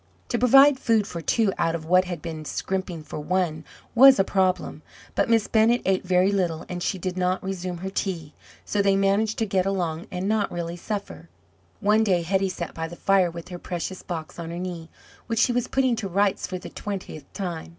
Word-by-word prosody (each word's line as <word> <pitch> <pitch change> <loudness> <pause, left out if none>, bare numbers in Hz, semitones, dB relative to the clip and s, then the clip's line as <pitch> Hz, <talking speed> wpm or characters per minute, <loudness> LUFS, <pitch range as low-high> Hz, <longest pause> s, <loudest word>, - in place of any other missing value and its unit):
To - - 0
provide 270 +2 +6
food 225 -5 +2
for 170 -3 -6
two 205 +4 +1
out 165 0 +1
of 160 -1 -6
what 185 +3 +4
had 175 -4 -6
been 160 -2 -5
scrimping 180 0 -3
for 150 - -7
one 160 -1 -1 0.3
was 265 +2 +8
a - - +4
problem; 190 -1 0 0.3
but - - +1
Miss 225 -2 +4
Bennett 230 +2 +3
ate 190 -1 +1
very 185 +1 +3
little, 175 -5 -1
and 180 -1 -5
she 190 - -1
did 185 0 -4
not 185 +1 0
resume 185 -2 -4
her 190 - -3
tea 170 -7 -3 0.3
so 205 - 0
they 200 -1 +3
managed 200 +3 +1
to 225 - +1
get 195 -2 0
along 175 -1 -2
and 185 +1 -3
not 215 -1 +1
really 170 0 -4
suffer. 200 +3 -6 0.5
One 215 +1 +4
day 185 -5 +2
Hetty 190 +2 +1
sat 170 -2 -5
by 165 0 -4
the 170 - -9
fire 190 -1 +3
with 170 +1 -9
her 175 -1 -7
precious 180 +1 -5
box 165 -2 -6
on 165 -1 -5
her 170 - -5
knee, 175 -2 -5 0.4
which 230 - -2
she 245 - +3
was 245 -1 0
putting 260 -2 +2
to 210 - -3
rights 195 +2 +1
for 185 - -4
the 180 - -9
twentieth 185 -8 -7
time. 175 -5 -5
185 Hz, 215 wpm, -25 LUFS, 170-205 Hz, 0.5 s, was